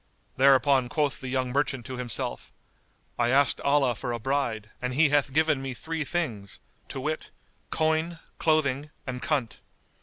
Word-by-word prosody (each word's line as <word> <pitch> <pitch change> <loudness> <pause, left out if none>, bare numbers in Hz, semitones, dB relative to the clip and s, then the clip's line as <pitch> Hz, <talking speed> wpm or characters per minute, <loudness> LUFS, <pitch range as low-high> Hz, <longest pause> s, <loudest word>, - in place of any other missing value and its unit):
Thereupon 135 -1 +4
quoth 145 0 0
the 130 - -5
young 130 -1 -1
merchant 130 -2 0
to 130 -1 -6
himself, 125 -3 -3 0.7
"I 120 0 +3
asked 135 +2 +3
Allah 140 -3 +3
for 120 +2 -4
a 120 - -3
bride, 115 -4 -1
and 125 0 -2
He 150 +1 +5
hath 145 -1 +2
given 155 -1 +2
me 135 -2 -4
three 160 +4 -3
things, 120 - -3 0.3
to - - -5
wit, - - -3 0.4
coin, 160 +2 0 0.2
clothing, 150 -3 +1 0.2
and 125 -1 -5
coynte." 140 -7 -1
135 Hz, 155 wpm, -27 LUFS, 125-150 Hz, 0.7 s, He